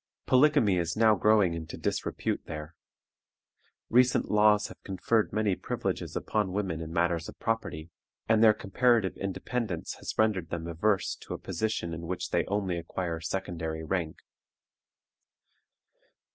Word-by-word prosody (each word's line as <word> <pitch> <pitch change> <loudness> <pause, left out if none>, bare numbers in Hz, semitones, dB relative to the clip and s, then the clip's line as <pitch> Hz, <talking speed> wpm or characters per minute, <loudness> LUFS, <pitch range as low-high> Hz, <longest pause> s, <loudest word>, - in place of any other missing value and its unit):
Polygamy 125 -8 +4
is 85 +2 -2
now 110 -1 +6
growing 105 -3 +4
into 80 -1 -6
disrepute - - -2
there. 75 +1 -6 1.1
Recent 125 +2 +3
laws 105 0 +5
have - - -13
conferred 105 +3 0
many 105 -2 +1
privileges - - -3
upon 105 -4 -1
women 95 -5 -2
in 80 0 -6
matters 85 -1 0
of - - -11
property, 85 -8 -3 0.4
and 110 0 +4
their 110 - +8
comparative 115 0 +2
independence 100 -1 -3
has - - -6
rendered 100 -7 +1
them 85 -1 -4
averse 95 +5 0
to - - -7
a - - -6
position 110 -6 -2
in 85 0 -6
which 90 +1 -4
they - - +2
only 95 -4 -1
acquire 85 0 -4
secondary 80 -2 -4
rank. 80 -1 -2
95 Hz, 135 wpm, -29 LUFS, 85-110 Hz, 1.1 s, their